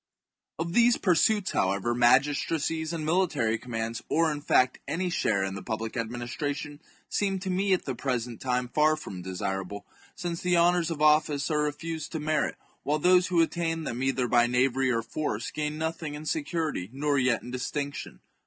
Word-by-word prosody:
Of 170 +1 -3
these 240 +2 +5
pursuits, 195 +2 +2
however, 100 +5 +1
magistracies 145 +6 +2
and 165 -2 -3
mili 180 +2 +3
tary 115 -7 0
commands, 115 -1 -4
or 165 0 +3
in 145 -1 -4
fact 130 -3 +3
any 180 +2 -1
share 100 - +1
in 95 0 -2
the 95 - -6
public 110 +1 -4
ad 115 -3 -2
ministration, 145 +4 -4 0.3
seem 195 -2 0
to 185 0 -3
me 195 +2 +1
at 185 - 0
the 135 - -2
present 120 -2 -3
time 125 -1 0
far 155 +4 +3
from 95 -12 -8
desirable, 95 +2 -4 0.3
since 170 -1 -4
the 180 -1 +2
honours 175 0 +3
of 155 -2 -2
office 150 -1 +3
are 150 -1 +2
refused 160 +2 -4
to 160 - -2
merit, 155 0 0 0.3
while 150 +2 0
those 180 +3 +4
who 175 -2 +4
attain 165 -1 -2
them 120 -4 -4
either 130 -2 +1
by 120 0 +4
knavery 130 +2 +2
chap. 125 - +2
or 115 - 0
force 115 -3 -3
gain 150 0 -3
nothing 160 -1 -3
in 150 +1 -8
security 165 - -2
nor 140 +1 0
yet 125 -2 +1
in 125 - -8
distinction. 140 +3 -4
150 Hz, 185 wpm, -28 LUFS, 120-165 Hz, 0.3 s, these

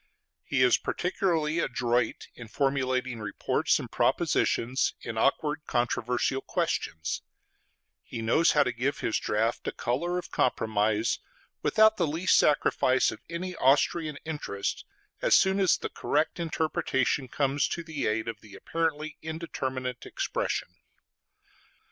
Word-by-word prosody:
He 135 -2 +1
is 125 - +5
particularly 170 -3 0
adroit 120 -6 0
in 120 - -10
formulating 130 -2 0
reports 105 -2 0
and - - -7
propositions 125 +4 +1
in 115 - -5
awkward 150 +6 +1
controversial 120 +2 0
questions; 80 -9 -2 0.8
he - - -7
knows 115 +9 +3
how 150 - +5
to 125 - -1
give 125 +5 -2
his 115 - 0
draught 110 +2 -1
a - - 0
color 170 +9 -1
of 180 - -6
compromise 110 -2 +1 0.4
without 220 0 +4
the 170 - +1
least 165 +5 +2
sacrifice 130 -3 +3
of - - -10
any 180 +2 -4
Austrian 145 +3 +2
interest, 145 -11 -3 0.4
as - - +5
soon 190 +1 +4
as 190 -3 +4
the - - -5
correct 155 +4 -1
interpretation 155 -5 0
comes 140 +2 +1
to 170 - -4
the 160 -4 -3
aid 110 +1 -1
of 115 -2 -5
the 105 -2 -13
apparently 155 -2 -2
indeterminate 130 -6 -4
expression. - - -2
135 Hz, 130 wpm, -28 LUFS, 120-160 Hz, 0.8 s, is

